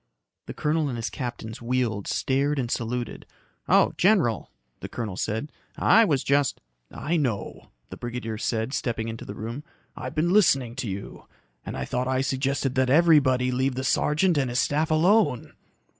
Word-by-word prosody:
The -, -, -7 dB
colonel 150 Hz, 0 st, 0 dB
and 120 Hz, -, -4 dB
his 115 Hz, -1 st, -3 dB
captains 120 Hz, -4 st, -6 dB
wheeled, 120 Hz, -4 st, -1 dB
stared 140 Hz, +2 st, 0 dB
and 125 Hz, -3 st, -2 dB
saluted. 120 Hz, 0 st, -3 dB, 0.4 s
"Oh, -, -, +4 dB
general," 175 Hz, -, +2 dB, 0.3 s
the -, -, -7 dB
colonel 110 Hz, -5 st, -4 dB
said. 110 Hz, +9 st, -3 dB, 0.3 s
"I 225 Hz, +1 st, +5 dB
was 145 Hz, -9 st, +1 dB
just 140 Hz, -1 st, +1 dB, 0.2 s
" -, -, -46 dB, 0.2 s
"I 170 Hz, -, +3 dB
know," 125 Hz, -10 st, -3 dB, 0.2 s
the -, -, -7 dB
brigadier 120 Hz, -2 st, -5 dB
said, 115 Hz, +2 st, -2 dB
stepping 115 Hz, -4 st, -2 dB
into 115 Hz, 0 st, -7 dB
the 100 Hz, -, -7 dB
room. 115 Hz, +7 st, -6 dB, 0.3 s
"I've -, -, -6 dB
been 170 Hz, +3 st, +1 dB
listening 135 Hz, -, +3 dB
to 125 Hz, -5 st, -3 dB
you. 100 Hz, +1 st, -7 dB, 0.4 s
And -, -, -6 dB
I 65 Hz, -, -3 dB
thought 125 Hz, -, -2 dB
I 130 Hz, 0 st, +1 dB
suggested 135 Hz, 0 st, -1 dB
that 130 Hz, -1 st, +1 dB
everybody 140 Hz, -5 st, +4 dB
leave 130 Hz, +1 st, 0 dB
the 130 Hz, -, -3 dB
sergeant 150 Hz, +5 st, +2 dB
and 130 Hz, -2 st, 0 dB
his 120 Hz, -, -2 dB
staff 155 Hz, +3 st, +1 dB
alone." 170 Hz, -, +2 dB
130 Hz, 175 wpm, -25 LUFS, 115-150 Hz, 0.4 s, I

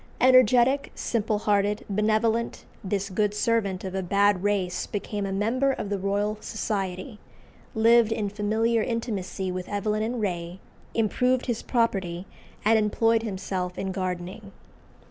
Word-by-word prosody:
Energetic, 255 Hz, +2 st, +5 dB
simple 220 Hz, -2 st, -1 dB
hearted, 205 Hz, 0 st, +1 dB
benevolent, 220 Hz, +3 st, 0 dB, 0.2 s
this 195 Hz, 0 st, -1 dB
good 210 Hz, +2 st, 0 dB
servant 210 Hz, -4 st, 0 dB
of 190 Hz, -1 st, -5 dB
a 190 Hz, -, -1 dB
bad 200 Hz, +1 st, +2 dB
race 195 Hz, -3 st, -1 dB
became 205 Hz, -1 st, -3 dB
a -, -, -4 dB
member 235 Hz, +8 st, +1 dB
of 210 Hz, -, -4 dB
the 200 Hz, -1 st, -1 dB
Royal 205 Hz, +2 st, -1 dB
Society, 195 Hz, -2 st, -3 dB, 0.6 s
lived 230 Hz, 0 st, +5 dB
in 215 Hz, -2 st, -1 dB
familiar 220 Hz, +3 st, +1 dB
intimacy 205 Hz, -5 st, -3 dB
with 180 Hz, 0 st, -5 dB
Evelyn 210 Hz, +1 st, -1 dB
and 235 Hz, +2 st, -2 dB
Ray, 175 Hz, -3 st, -3 dB, 0.4 s
improved 250 Hz, +3 st, +1 dB
his 235 Hz, -3 st, -2 dB
property, 190 Hz, -7 st, -1 dB, 0.4 s
and 220 Hz, +1 st, +5 dB
employed 225 Hz, +2 st, +2 dB
himself 190 Hz, -3 st, -4 dB
in 190 Hz, 0 st, -2 dB
gardening. 185 Hz, +2 st, -4 dB
210 Hz, 135 wpm, -26 LUFS, 195-225 Hz, 0.6 s, Energetic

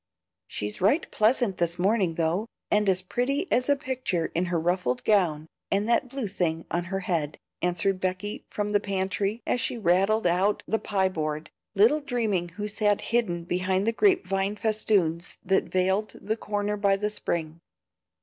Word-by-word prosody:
She's 105 Hz, +7 st, -4 dB
right 245 Hz, -, +3 dB
pleasant 215 Hz, -3 st, +2 dB
this 170 Hz, 0 st, 0 dB
morning 190 Hz, -2 st, +1 dB
though, 170 Hz, +7 st, 0 dB, 0.2 s
and 210 Hz, -1 st, +3 dB
as 185 Hz, -1 st, +2 dB
pretty 270 Hz, -, -1 dB
as 250 Hz, +3 st, +2 dB
a 285 Hz, -, +5 dB
picture 255 Hz, -11 st, -2 dB
in 175 Hz, +2 st, 0 dB
her 170 Hz, -1 st, -1 dB
ruffled 165 Hz, -7 st, 0 dB
gown 170 Hz, -8 st, +2 dB, 0.2 s
and 200 Hz, +2 st, +1 dB
that 235 Hz, +2 st, +2 dB
blue 270 Hz, -2 st, -4 dB
thing 170 Hz, -5 st, -1 dB
on 175 Hz, 0 st, -1 dB
her 195 Hz, +2 st, -3 dB
head," 160 Hz, -5 st, -1 dB, 0.2 s
answered 180 Hz, +2 st, +2 dB
Becky 185 Hz, +3 st, -3 dB
from 210 Hz, 0 st, -3 dB
the 205 Hz, -, +3 dB
pantry, 200 Hz, +2 st, -2 dB
as 245 Hz, -, 0 dB
she 240 Hz, -, -1 dB
rattled 195 Hz, +2 st, +2 dB
out 185 Hz, +4 st, +2 dB
the 225 Hz, -, 0 dB
pie 190 Hz, -3 st, +1 dB
board, 155 Hz, -3 st, -4 dB, 0.2 s
little 230 Hz, +10 st, +4 dB
dreaming 220 Hz, -10 st, -1 dB
who 205 Hz, +5 st, -5 dB
sat 210 Hz, -1 st, +1 dB
hidden 180 Hz, -8 st, +1 dB
behind 185 Hz, +2 st, 0 dB
the 230 Hz, -, +1 dB
grape 370 Hz, -, +3 dB
vine 195 Hz, +1 st, -1 dB
festoons 205 Hz, -6 st, +1 dB
that 190 Hz, +1 st, +2 dB
veiled 190 Hz, +3 st, 0 dB
the 215 Hz, +2 st, -2 dB
corner 210 Hz, -1 st, -2 dB
by 200 Hz, -1 st, +3 dB
the 210 Hz, +2 st, -2 dB
spring. 165 Hz, -5 st, -3 dB
195 Hz, 170 wpm, -26 LUFS, 175-215 Hz, 0.2 s, a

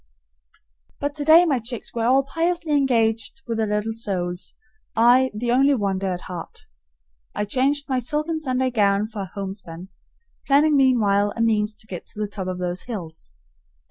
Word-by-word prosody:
But 285 Hz, 0 st, -2 dB
today 315 Hz, +4 st, +6 dB
my 280 Hz, -7 st, +1 dB
chicks 235 Hz, +1 st, -6 dB
were 230 Hz, -1 st, -1 dB
all 265 Hz, +2 st, +4 dB
piously 335 Hz, +3 st, -1 dB
engaged 230 Hz, -6 st, +1 dB
with 230 Hz, -1 st, -3 dB
their 220 Hz, -, +1 dB
little 210 Hz, +2 st, -1 dB
souls, 180 Hz, -5 st, -4 dB, 0.4 s
I 245 Hz, +3 st, +5 dB
the 235 Hz, +3 st, -2 dB
only 275 Hz, +3 st, +4 dB
wanderer 195 Hz, -4 st, -1 dB
at 175 Hz, -, -9 dB
heart. 175 Hz, -3 st, -9 dB, 0.7 s
I 210 Hz, -, -1 dB
changed 275 Hz, +6 st, +1 dB
my 260 Hz, -2 st, 0 dB
silken 305 Hz, +6 st, -2 dB
Sunday 260 Hz, -3 st, -1 dB
gown 205 Hz, -2 st, +2 dB
for 210 Hz, -3 st, -5 dB
homespun, 190 Hz, -2 st, -7 dB, 0.6 s
planning 295 Hz, +2 st, +4 dB
meanwhile 210 Hz, -7 st, +3 dB
a 230 Hz, -, -3 dB
means 215 Hz, -2 st, +1 dB
to 215 Hz, -, -15 dB
get 185 Hz, -5 st, -8 dB
to -, -, -10 dB
the 210 Hz, -, 0 dB
top 200 Hz, -2 st, -6 dB
of 185 Hz, -1 st, -3 dB
those 180 Hz, 0 st, -3 dB
hills. 165 Hz, -, -6 dB
225 Hz, 165 wpm, -23 LUFS, 200-270 Hz, 0.7 s, today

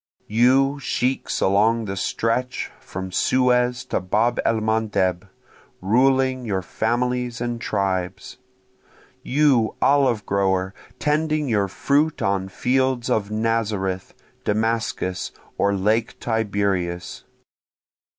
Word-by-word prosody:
You 130 Hz, +5 st, +3 dB
sheiks 130 Hz, 0 st, -1 dB
along 110 Hz, +4 st, +3 dB
the 95 Hz, -1 st, -4 dB
stretch 115 Hz, +6 st, -1 dB
from 95 Hz, 0 st, -7 dB
Suez 125 Hz, +2 st, +2 dB
to -, -, -1 dB
Bab 110 Hz, +6 st, +1 dB
el 115 Hz, -1 st, +1 dB
mandeb 105 Hz, -4 st, 0 dB, 0.5 s
ruling 130 Hz, +5 st, +2 dB
your 95 Hz, -5 st, -2 dB
families 120 Hz, +4 st, -1 dB
and 120 Hz, -1 st, -3 dB
tribes! 95 Hz, +1 st, -2 dB, 0.8 s
You 130 Hz, -5 st, +2 dB
olive 130 Hz, -7 st, +3 dB
grower 95 Hz, -1 st, 0 dB, 0.2 s
tending 150 Hz, 0 st, 0 dB
your 105 Hz, -5 st, +1 dB
fruit 145 Hz, +10 st, +1 dB
on 95 Hz, -1 st, 0 dB
fields 130 Hz, +3 st, 0 dB
of 100 Hz, -2 st, 0 dB
Nazareth, 105 Hz, -4 st, -1 dB, 0.3 s
Damascus, 110 Hz, -4 st, -1 dB, 0.2 s
or 100 Hz, -, +2 dB
lake 110 Hz, +4 st, 0 dB
Tiberias! 100 Hz, -6 st, -1 dB
110 Hz, 100 wpm, -22 LUFS, 100-125 Hz, 0.8 s, You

